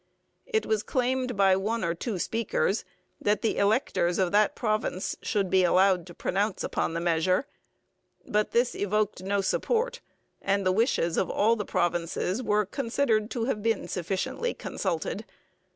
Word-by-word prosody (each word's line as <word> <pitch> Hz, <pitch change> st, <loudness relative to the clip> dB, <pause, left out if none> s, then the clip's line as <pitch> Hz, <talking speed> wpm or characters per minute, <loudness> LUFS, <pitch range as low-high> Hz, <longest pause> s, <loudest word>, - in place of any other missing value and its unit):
It 440 Hz, 0 st, 0 dB
was 215 Hz, -1 st, +1 dB
claimed 255 Hz, -1 st, -1 dB
by 195 Hz, -1 st, +5 dB
one 215 Hz, +4 st, -1 dB
or 170 Hz, -1 st, 0 dB
two 200 Hz, +4 st, -4 dB
speakers 220 Hz, +1 st, 0 dB, 0.4 s
that 210 Hz, +4 st, +1 dB
the 225 Hz, -, +1 dB
electors 200 Hz, -4 st, +2 dB
of 185 Hz, -2 st, +1 dB
that 210 Hz, 0 st, +3 dB
province 215 Hz, -4 st, -1 dB
should 200 Hz, -2 st, 0 dB
be 190 Hz, -1 st, +4 dB
allowed 185 Hz, 0 st, +3 dB
to 175 Hz, -, -11 dB
pronounce 200 Hz, +2 st, -1 dB
upon 165 Hz, -, -1 dB
the -, -, 0 dB
measure, 175 Hz, +6 st, +1 dB, 0.8 s
but 210 Hz, 0 st, +1 dB
this 240 Hz, +1 st, +2 dB
evoked 205 Hz, -1 st, -1 dB
no 200 Hz, +1 st, 0 dB
support, 480 Hz, -, 0 dB, 0.4 s
and 200 Hz, 0 st, 0 dB
the 185 Hz, -, +4 dB
wishes 185 Hz, -, +1 dB
of 180 Hz, -, +1 dB
all 225 Hz, +3 st, +3 dB
the 210 Hz, -3 st, -4 dB
provinces 175 Hz, +5 st, -1 dB
were 210 Hz, -3 st, +1 dB
considered 230 Hz, -1 st, 0 dB
to 235 Hz, -3 st, -2 dB
have 225 Hz, -5 st, -1 dB
been 225 Hz, -1 st, 0 dB
sufficiently 190 Hz, -, -2 dB
consulted. -, -, -3 dB
205 Hz, 155 wpm, -27 LUFS, 185-230 Hz, 0.8 s, by